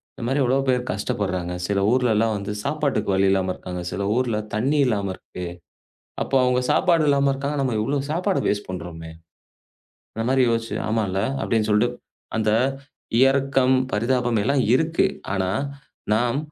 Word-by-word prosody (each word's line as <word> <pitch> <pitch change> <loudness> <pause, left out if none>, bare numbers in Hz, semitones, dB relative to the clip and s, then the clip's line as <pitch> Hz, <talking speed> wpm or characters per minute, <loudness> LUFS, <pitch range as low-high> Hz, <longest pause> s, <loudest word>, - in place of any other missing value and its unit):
இந்த - - -8
மாரி 135 +3 +1
எவ்வளவோ 130 +2 +2
பேர் 125 -1 +2
கஷ்டப்படுறாங்க 95 -3 -2
சில 100 -1 +1
ஊர்ல 125 -2 +3
எல்லாம் 110 +1 +2
வந்து 100 +1 -5
சாப்பாட்டுக்கு 145 -4 -1
வழியில்லாம 95 -1 +2
இருக்காங்க. 90 -1 -6
சில 95 - -3
ஊர்ல 120 -3 0 0.2
தண்ணி 130 +8 +1
இல்லாம 105 -5 0
இருக்கு 90 0 -8 0.8
அப்ப - - -11
அவங்க 125 0 +2
சாப்பாடு 170 -4 +3
இல்லாம 140 -1 +3
இருக்காங்க. 140 +2 -3
நம்ம 130 -4 0
எவ்வளவு 140 +4 -1
சாப்பாடு 180 +4 0
வேஸ்ட் 105 0 -1
பண்றோமே. 80 -2 -7 1.0
அந்த 115 - -2
மாரி 135 0 +4
யோசிச்சு, 115 0 -1
ஆமால்ல 105 -4 0 0.2
அப்படின்னு 110 -2 0
சொல்லிட்டு 120 +4 +2 0.4
அந்த 110 -1 +2 0.8
இரக்கம், 135 -1 +2 0.2
பரிதாபம் 120 +1 +1
எல்லாம் 135 +2 +2
இருக்கு. 160 +3 +1 0.3
ஆனா 95 -1 0 0.6
நாம் 120 +4 +1
120 Hz, 145 wpm, -23 LUFS, 100-135 Hz, 1.0 s, மாரி